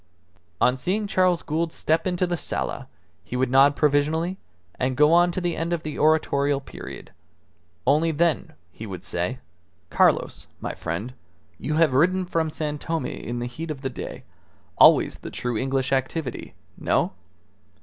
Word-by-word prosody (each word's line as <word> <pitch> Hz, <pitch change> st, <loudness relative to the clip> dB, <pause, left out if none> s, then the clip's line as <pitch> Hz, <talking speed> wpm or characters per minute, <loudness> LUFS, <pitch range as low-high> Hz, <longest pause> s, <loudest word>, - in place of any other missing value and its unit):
On 125 Hz, -, +4 dB
seeing 190 Hz, +10 st, -1 dB
Charles 185 Hz, -3 st, +2 dB
Gould 160 Hz, +2 st, -1 dB
step 160 Hz, +2 st, 0 dB
into 180 Hz, 0 st, +1 dB
the 175 Hz, -1 st, -1 dB
sala 160 Hz, -, -4 dB, 0.4 s
he -, -, -7 dB
would 125 Hz, 0 st, +1 dB
nod 140 Hz, +2 st, +6 dB
provisionally 155 Hz, +5 st, +1 dB, 0.4 s
and 130 Hz, 0 st, 0 dB
go 150 Hz, +2 st, +5 dB
on 175 Hz, +1 st, +5 dB
to 180 Hz, -, -2 dB
the 175 Hz, -2 st, -1 dB
end 165 Hz, +1 st, -2 dB
of 170 Hz, -1 st, -2 dB
the 155 Hz, -1 st, -5 dB
oratorial 145 Hz, -2 st, +2 dB
period. 135 Hz, -, -10 dB, 0.7 s
Only 150 Hz, +5 st, +3 dB
then 160 Hz, -1 st, 0 dB, 0.2 s
he 110 Hz, +7 st, -9 dB
would 95 Hz, -3 st, -7 dB
say 90 Hz, +9 st, -2 dB, 0.5 s
"Carlos, -, -, +2 dB
my -, -, -4 dB
friend, 105 Hz, +10 st, -4 dB, 0.5 s
you 150 Hz, -, -2 dB
have 160 Hz, -4 st, +4 dB
ridden 185 Hz, +7 st, +3 dB
from 165 Hz, -2 st, 0 dB
San 150 Hz, -1 st, -3 dB
Tome 160 Hz, -4 st, -2 dB
in 120 Hz, -1 st, -5 dB
the 120 Hz, -, -3 dB
heat 160 Hz, +7 st, -6 dB
of 145 Hz, -3 st, -5 dB
the 135 Hz, -, -2 dB
day. -, -, -7 dB, 0.5 s
Always -, -, +6 dB
the -, -, -7 dB
true 125 Hz, -1 st, -3 dB
English 135 Hz, +2 st, -1 dB
activity. 135 Hz, +2 st, -2 dB, 0.2 s
No? -, -, +1 dB
150 Hz, 160 wpm, -24 LUFS, 130-165 Hz, 0.7 s, nod